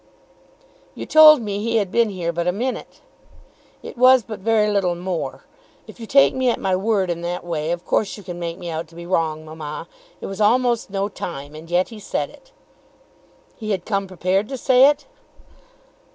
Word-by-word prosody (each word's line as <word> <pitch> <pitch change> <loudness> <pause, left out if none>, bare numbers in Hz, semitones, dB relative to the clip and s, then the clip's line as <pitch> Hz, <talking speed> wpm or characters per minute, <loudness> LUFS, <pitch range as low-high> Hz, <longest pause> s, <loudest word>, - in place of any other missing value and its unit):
"You - - -6
told 310 -4 +8
me 205 -1 -3
he 230 +1 -1
had 200 -4 +1
been 235 -2 +2
here 175 -4 -3
but 170 +1 -2
a - - +3
minute." 245 +7 -5 0.8
"It 240 - -9
was 255 -1 +6
but 215 -1 -8
very 215 +1 +2
little 195 -4 +1
more. 175 -1 -4 0.4
If - - -14
you 225 - -8
take 275 +4 +5
me 260 -1 +1
at 235 - 0
my 190 -1 0
word 195 -2 0
in 170 0 -4
that 175 +1 -4
way, 160 -2 -3
of 175 +1 -3
course 210 - 0
you 205 - -11
can 175 -1 -7
make 170 0 -4
me 180 -2 -8
out 160 +1 -4
to 165 - -19
be 170 0 -9
wrong, 160 -3 -1
mamma. 155 +1 -7 0.3
It - - -7
was 195 +2 -5
almost 240 +1 +2
no 195 0 -1
time, 145 -7 -7
and 155 +2 -11
yet 175 +1 +1
he 225 -2 -10
said 205 - -3
it." - - -20 1.1
"He 215 -2 -6
had 190 -4 -2
come 200 -2 -1
prepared 185 +3 -1
to 270 - -4
say 255 +1 +5
it." 295 0 -2
195 Hz, 200 wpm, -21 LUFS, 175-230 Hz, 1.1 s, told